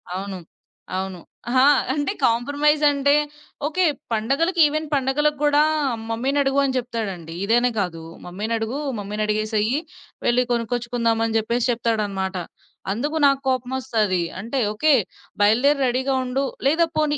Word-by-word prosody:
అవును. 195 0 -5 0.6
అవును. 190 -2 -4 0.3
హా! 260 0 +5 0.3
అంటే, 290 -2 -1
కాంప్రమైజంటే 285 +3 +3 0.5
ఓకే 365 +4 0 0.3
పండగలకి, 275 - 0
ఈవెన్ 310 +1 -2
పండగలకు 285 +2 +1
గూడా 295 0 +4 0.5
"మమ్మీనడుగు" 270 +4 +1
అని 265 -1 0
జెప్తాడండీ. 205 -9 -4
ఇదనే 240 +3 +3
కాదు, 175 -4 -3 0.2
"మమ్మీనడుగూ, 220 +6 -3 0.2
మమ్మీనడిగేసెయ్యీ 215 +4 -1 0.5
వెళ్లి 245 +1 +3
కొనుక్కొచ్చుకుందామని" 230 -1 0
జెప్పేసి 235 +3 0
చెప్తాడనమాట. 210 -5 -1 0.6
అందుకు 290 +8 -3
నాకు 275 -1 +2
కోపమొస్తది. 245 -7 0 0.2
అంటే, 235 +6 -3
"ఓకే. 305 +7 +3 0.5
బయలుదేరు 245 +8 +4
రెడీగా 260 +2 0
ఉండు," 260 +2 -1 0.2
లేదా 325 +4 +3
పోనీ 300 -1 +1
245 Hz, 110 wpm, -22 LUFS, 215-280 Hz, 0.6 s, హా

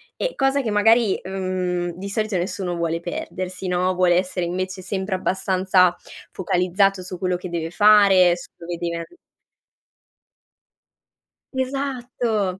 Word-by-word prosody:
E, - - -2
cosa 270 0 +2
che 225 -4 -2
magari, 225 0 +3
mhmm, 185 -2 -2
di 200 +2 -6
solito 215 -1 -1
nessuno 180 0 -2
vuole 165 0 -1
perdersi, 185 +2 -5
no? 180 +1 +1
Vuole 180 -1 +3
essere 180 0 0
invece 185 +2 -3
sempre 190 +1 -3
abbastanza 185 -1 +2 0.4
focalizzato 185 +1 +1
su 180 0 -5
quello 180 -1 0
che 180 0 -6
deve 165 -1 -3
fare, 195 -3 +5
su - - -10
dove 170 0 -6
deve 170 0 -3
an 170 - -4 2.5
Esatto! 250 -7 -2
185 Hz, 130 wpm, -22 LUFS, 180-205 Hz, 2.5 s, fare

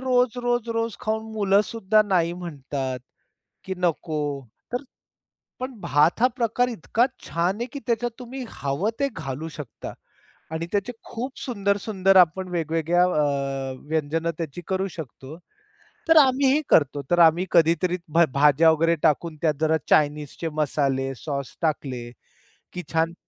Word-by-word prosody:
रोज, 250 -2 +2
रोज, 240 -1 0
रोज 230 -1 -2
खाऊन 220 +1 -2
मुलं 200 -2 +3
सुद्धा 215 -1 +2
नाही 180 -5 +1
म्हणतात 140 -6 -5 0.7
की 190 - -3
नको. 165 -3 -1 0.5
तर 250 +3 -1 0.8
पण 255 -3 -6
भात 150 +9 +2
हा 250 - +7
प्रकार 240 +1 +1
इतका 230 +2 +1 0.2
छान 175 +3 0
आहे, 240 - 0
की 285 - -4
त्याच्यात 240 +1 0
तुम्ही 255 +1 -7
हवं 140 +9 -2
ते 280 0 +1
घालू 135 +5 -5
शकता. 140 -7 -8 0.6
आणि 160 +1 -3
त्याचे 205 +4 -1 0.2
खूप 250 +3 -5
सुंदर-सुंदर 200 -4 +1
आपण 185 +1 +4
वेगवेगळ्या 165 +1 +1
अ, 140 -5 0 0.2
व्यंजन 160 +1 0
त्याची 165 0 -5
करू 190 +1 0
शकतो. 140 0 -8 0.7
तर 325 - +6
आम्ही 270 -1 +4
ही 300 - +3
करतो. 145 -1 +4
तर 175 - +3
आम्ही 165 +2 +6
कधीतरी 170 +2 +3 0.2
भा 170 +1 +6
भाज्या 150 +3 +5
वगैरे 165 +2 +2
टाकून, 160 +1 +1
त्या 160 - +4
जरा 160 0 +3
चाइनीजचे 150 +2 +1
मसाले, 135 -2 0
सॉस 140 -1 -5
टाकले. 130 -6 -2 0.6
की 180 - -5
छान 165 +1 +1
170 Hz, 140 wpm, -24 LUFS, 150-220 Hz, 0.8 s, हा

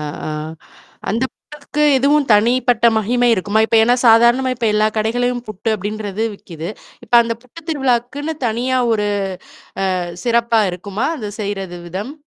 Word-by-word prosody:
ஆ, - - -5 0.3
ஆ - - -3 0.8
அந்த 230 +5 0
புட்டுக்கு 300 0 -5
எதுவும் 280 +1 +2
தனிப்பட்ட 235 +2 +3
மகிமை 245 +3 +1
இருக்குமா? 205 +1 0
இப்ப 225 - 0
ஏன்னா 245 +2 +4
சாதாரணமா 235 +3 +5
இப்ப 230 -2 -1
எல்லா 215 0 +3
கடைகள்ளையும் 245 +3 0
புட்டு 215 +1 -4
அப்படின்றது 210 +1 -4
விக்குது. 165 -3 -8 0.4
இப்ப - - -19
அந்த 230 - -2
புட்டு 255 +7 -13
திருவிழாக்குன்னு 275 +2 -1
தனியா 250 +3 0
ஒரு 210 -1 0 0.9
அ - - -1 0.3
சிறப்பா 235 -1 +2
இருக்குமா? 200 +7 -4
அந்த 210 -4 -5
செய்றது, 195 -4 -4
விதம்? 200 - -5
230 Hz, 140 wpm, -18 LUFS, 210-250 Hz, 0.9 s, சாதாரணமா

